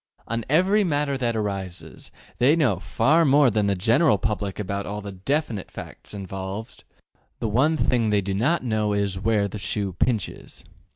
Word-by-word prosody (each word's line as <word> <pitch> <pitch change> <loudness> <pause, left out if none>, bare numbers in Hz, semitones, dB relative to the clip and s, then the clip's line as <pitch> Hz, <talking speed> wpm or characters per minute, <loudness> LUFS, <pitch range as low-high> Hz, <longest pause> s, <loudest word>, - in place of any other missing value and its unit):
On 115 +1 -2
every 190 +8 +4
matter 145 -5 0
that 120 -3 -1
arises, 100 -4 -5 0.3
they 135 +6 +5
know 155 -6 +2
far 160 +4 +2
more 140 -3 +5
than 105 -1 +1
the 100 - +1
general 115 - +3
public 100 -2 -2
about 100 -1 -3
all 105 +1 -4
the 100 -1 -7
DEFINITE 110 - -2
facts - - -10
involved; 95 +2 -6 0.5
the 115 - -2
one 135 +9 +2
thing 120 -6 +1
they 105 -1 +2
do 95 0 -3
not 140 - +1
know 110 -3 0
is 100 -2 -1
``where 105 +1 +1
the 105 +1 -7
shoe 100 -1 -1
pinches.'' 110 +4 -2
110 Hz, 170 wpm, -24 LUFS, 100-135 Hz, 0.5 s, they